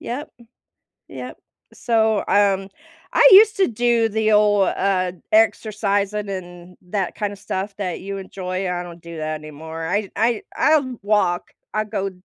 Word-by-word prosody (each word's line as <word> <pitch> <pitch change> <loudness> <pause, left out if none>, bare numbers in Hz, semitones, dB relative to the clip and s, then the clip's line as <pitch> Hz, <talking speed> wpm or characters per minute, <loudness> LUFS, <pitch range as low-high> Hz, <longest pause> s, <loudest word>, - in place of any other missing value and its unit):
yep. 255 +5 -5 0.8
Yep. - - -8 0.4
So, 220 -3 +1
um, 195 -1 +2 0.4
I - - +7
used 425 +2 +8
to 390 - +3
do 235 0 +2
the 220 0 +1
old, 205 -2 +4
uh, 185 -2 0 0.2
exercising 210 -2 +1
and 175 -1 -8
that 195 -2 -2
kinda 205 -1 -3
stuff 195 0 -4
that 185 -4 -3
you 195 +1 -5
enjoy, 185 -1 -4
I 175 0 -3
don't 170 -1 -11
do 170 -1 -9
that 155 0 -3
anymore. 160 +2 -7
I 200 +3 -1
I 230 -1 +1
I'll 280 -6 +2
walk, 205 -4 +1 0.2
I 215 - 0
go 195 -2 -3
200 Hz, 145 wpm, -21 LUFS, 180-220 Hz, 0.8 s, used